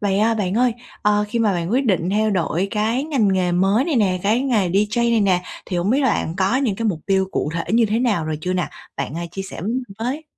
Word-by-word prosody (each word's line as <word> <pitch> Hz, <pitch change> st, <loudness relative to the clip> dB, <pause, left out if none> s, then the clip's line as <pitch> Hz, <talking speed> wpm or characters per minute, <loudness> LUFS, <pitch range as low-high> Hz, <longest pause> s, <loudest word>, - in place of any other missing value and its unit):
Vậy, 200 Hz, -1 st, +1 dB
ờ, 225 Hz, +2 st, +3 dB
bạn 195 Hz, -3 st, -1 dB
ơi, 245 Hz, +1 st, +3 dB, 0.3 s
ờ, 210 Hz, 0 st, +3 dB
khi 235 Hz, -, -2 dB
mà 220 Hz, -3 st, +2 dB
bạn 175 Hz, -1 st, -2 dB
quyết 265 Hz, +4 st, +2 dB
định 185 Hz, -4 st, +1 dB
theo 215 Hz, +2 st, +1 dB
đổi 185 Hz, 0 st, 0 dB
cái 225 Hz, +5 st, 0 dB
ngành 270 Hz, -10 st, +1 dB
nghề 180 Hz, -2 st, +1 dB
mới 195 Hz, +8 st, +2 dB
này 320 Hz, -6 st, 0 dB
nè, 190 Hz, -5 st, +2 dB
cái 215 Hz, +4 st, +2 dB
nghề 235 Hz, -9 st, +1 dB
DJ 210 Hz, +6 st, +1 dB
này 230 Hz, -1 st, +3 dB
nè, 185 Hz, -3 st, +2 dB, 0.2 s
thì 180 Hz, -, -3 dB
hổng 175 Hz, +4 st, 0 dB
biết 270 Hz, +4 st, +3 dB
là 265 Hz, -, +3 dB
bạn 165 Hz, -4 st, -2 dB
có 195 Hz, +6 st, +2 dB
những 250 Hz, -8 st, 0 dB
cái 230 Hz, -, -3 dB
mục 175 Hz, -7 st, -1 dB
tiêu 190 Hz, -1 st, +2 dB
cụ 150 Hz, -, -1 dB
thể 170 Hz, -, -2 dB
như 230 Hz, 0 st, +4 dB
thế 215 Hz, +2 st, 0 dB
nào 225 Hz, -10 st, +1 dB
rồi 155 Hz, -1 st, -3 dB
chưa 180 Hz, +3 st, -2 dB
nè? 180 Hz, -3 st, -1 dB, 0.3 s
Bạn, 140 Hz, +2 st, -4 dB
à, 170 Hz, -, -3 dB
chia 195 Hz, +2 st, -5 dB
sẻ 195 Hz, -, -8 dB
với 190 Hz, -, -3 dB
mình 255 Hz, +2 st, -1 dB, 0.2 s
với. 260 Hz, +7 st, -3 dB
205 Hz, 280 wpm, -21 LUFS, 185-235 Hz, 0.3 s, như